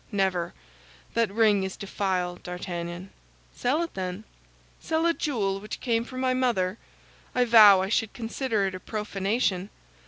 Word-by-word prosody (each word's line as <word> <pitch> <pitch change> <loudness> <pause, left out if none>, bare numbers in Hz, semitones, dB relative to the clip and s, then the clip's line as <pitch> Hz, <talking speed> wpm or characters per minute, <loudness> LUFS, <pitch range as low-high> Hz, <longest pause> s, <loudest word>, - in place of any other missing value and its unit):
Never; 190 -4 0 0.6
that 230 -3 +1
ring 210 -2 +3
is 190 0 -4
defiled, 185 -3 -2
D'Artagnan." 180 0 -6 0.4
"Sell 290 +7 +1
it, 335 - -6
then." 185 +2 -4 0.6
"Sell 320 +1 0
a 340 - +4
jewel 205 -12 -1
which 210 +1 -7
came 230 -2 0
from 255 +1 -7
my 255 -1 +2
mother! 230 -6 0 0.6
I 250 0 +3
vow 210 -5 +8
I 190 - -3
should 225 0 +1
consider 230 -2 -1
it 190 - -2
a 185 - -6
profanation." 205 -1 -1
205 Hz, 150 wpm, -26 LUFS, 185-235 Hz, 0.6 s, vow